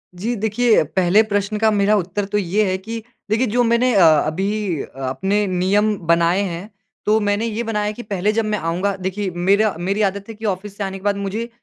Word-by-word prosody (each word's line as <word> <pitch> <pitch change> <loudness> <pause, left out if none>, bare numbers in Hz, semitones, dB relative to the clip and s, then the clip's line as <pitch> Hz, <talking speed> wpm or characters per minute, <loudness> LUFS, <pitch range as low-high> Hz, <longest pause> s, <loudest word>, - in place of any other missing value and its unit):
जी, 225 +7 -2
देखिए, 220 +1 +2
पहले 180 +6 +3
प्रश्न 205 0 -1
का 220 0 +4
मेरा 205 0 +3
उत्तर 195 +2 -2
तो 205 +1 -2
ये 200 +2 +1
है 185 - 0
कि 225 +3 -7 0.3
देखिए 225 +4 +2
जो 245 - +4
मैंने 235 +1 +2
अ, 190 - +6 0.2
अभी 190 0 -2 0.3
अपने 195 +11 0
नियम 200 +4 +1
बनाए 170 +3 +3
हैं, 185 +1 -4 0.4
तो 215 +1 +3
मैंने 205 +1 0
ये 230 +1 -2
बनाया 210 -2 -1
है 210 - -2
कि 240 - -8
पहले 200 0 0
जब 225 0 0
मैं 215 0 -1
आऊँगा 185 +3 -1
देखिए 190 +1 -3
मेरा 200 +3 +2
मेरी 195 +4 -1
आदत 200 +2 -10
है 225 - -7
कि 220 - -8
ऑफ़िस 200 0 -3
से 205 - -3
आने 195 0 -4
के 190 - -14
बाद 205 -1 +1
मुझे 210 +4 -3
205 Hz, 215 wpm, -20 LUFS, 190-215 Hz, 0.4 s, अ